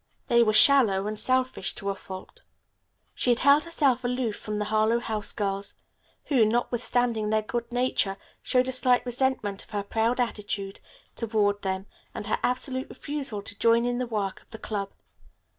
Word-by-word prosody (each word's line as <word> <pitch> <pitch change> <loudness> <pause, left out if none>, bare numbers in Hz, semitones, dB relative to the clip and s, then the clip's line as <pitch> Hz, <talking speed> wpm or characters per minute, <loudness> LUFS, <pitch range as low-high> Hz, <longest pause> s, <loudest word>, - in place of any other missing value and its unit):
They 235 0 +5
were 220 -2 +4
shallow 215 -4 +5
and 215 0 -1
selfish 255 -6 0
to 200 0 -3
a - - -5
fault. 190 -1 -10 0.7
She - - -1
had 240 - +4
held 285 +3 +5
herself 285 -8 +1
aloof 245 -3 -1
from 210 -1 -4
the 210 - -1
Harlowe 220 +2 +2
House 220 -3 -2
girls, 200 -1 -3 0.5
who, 260 -6 +3
notwithstanding 235 0 +1
their 215 0 +1
good 235 +2 -4
nature, 245 -5 0 0.2
showed 255 0 +1
a - - 0
slight 250 -1 +3
resentment 245 -5 -1
of - - -20
her 205 -2 -3
proud 225 +4 0
attitude 205 -4 -3 0.4
toward 210 -3 0
them 190 0 -3 0.3
and - - -5
her 215 - -1
absolute 260 +1 -1
refusal 275 -8 -4
to 205 0 -8
join 230 +1 +4
in 245 0 -1
the 250 - -2
work 205 -4 -3
of - - -28
the 220 - -9
club. 200 -3 -4
225 Hz, 175 wpm, -26 LUFS, 205-250 Hz, 0.7 s, They